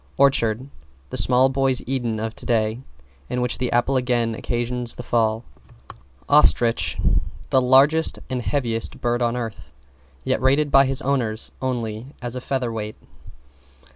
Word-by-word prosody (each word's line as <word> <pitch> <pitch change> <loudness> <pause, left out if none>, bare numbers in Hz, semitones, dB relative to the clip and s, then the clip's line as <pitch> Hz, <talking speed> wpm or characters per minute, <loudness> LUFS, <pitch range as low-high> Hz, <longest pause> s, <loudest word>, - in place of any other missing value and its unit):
=ORCHARD= 130 -3 +2 0.4
The - - -2
small 125 +1 +4
boy's 135 -1 +1
Eden 120 -4 -2
of 110 +1 -4
today, 110 0 -1 0.5
in 125 - -2
which 125 -1 -2
the 125 -1 -1
apple 125 +3 +2
again 120 -2 0
occasions 120 +1 -2
the 125 - -7
fall. 115 -1 0 0.8
=OSTRICH= 120 -5 +4 0.5
The 130 - +4
largest 140 +6 +4
and 130 -1 -3
heaviest 115 -4 -2
bird 120 0 -1
on 120 0 0
earth, 115 -3 -6 0.5
yet 110 - -1
rated 140 +3 +2
by 135 0 +6
his 135 0 -2
owners 120 -5 -1
only 120 0 -4
as 120 0 -5
a 125 - -4
featherweight. 115 -5 -3
125 Hz, 140 wpm, -22 LUFS, 115-130 Hz, 0.8 s, by